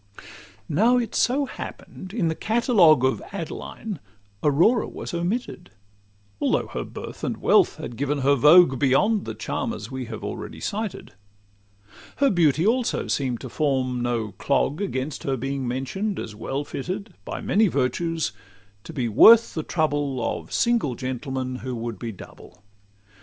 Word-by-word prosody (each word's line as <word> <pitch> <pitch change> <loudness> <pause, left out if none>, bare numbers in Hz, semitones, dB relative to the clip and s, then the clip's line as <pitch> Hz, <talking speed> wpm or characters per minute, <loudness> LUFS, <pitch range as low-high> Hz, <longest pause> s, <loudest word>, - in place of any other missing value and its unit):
Now 225 +11 +3
it 235 -2 -2
so 275 +4 +2
happen'd, 185 -7 -9
in 200 -6 0
the 160 - +1
catalogue 190 - +4
Of 130 - +1
Adeline, 200 +1 -6 0.4
Aurora 170 - +3
was - - -7
omitted, 175 - -3 0.7
Although - - +1
her - - -4
birth - - -9
and - - -2
wealth - - +4
had 120 - -7
given 140 +1 -1
her 140 +2 +4
vogue 150 0 +6
Beyond 195 - +2
the - - -5
charmers 235 - -4
we 130 -1 -4
have 110 -2 -8
already - - -6
cited; 210 - -4 1.0
Her 280 -1 +3
beauty 165 -3 +3
also 235 +2 +1
seem'd 130 -4 -1
to 130 - -7
form 130 -3 0
no 120 -3 -1
clog 140 +3 +1
Against 140 -7 -3
her 135 -1 -1
being 135 +1 -3
mention'd 185 - -2
as 110 - -5
well 135 +6 -3
fitted, 185 - -5
By - - -5
many 215 +2 +3
virtues, 160 - -1 0.5
to 165 - -8
be 130 -6 -1
worth 220 - +7
the 160 - -2
trouble 145 -6 -1
Of - - -15
single 235 - +1
gentlemen 130 0 -4
who 130 -1 -5
would 115 -3 -5
be 115 +2 -4
double. 100 +1 -14
145 Hz, 150 wpm, -24 LUFS, 130-200 Hz, 1.0 s, worth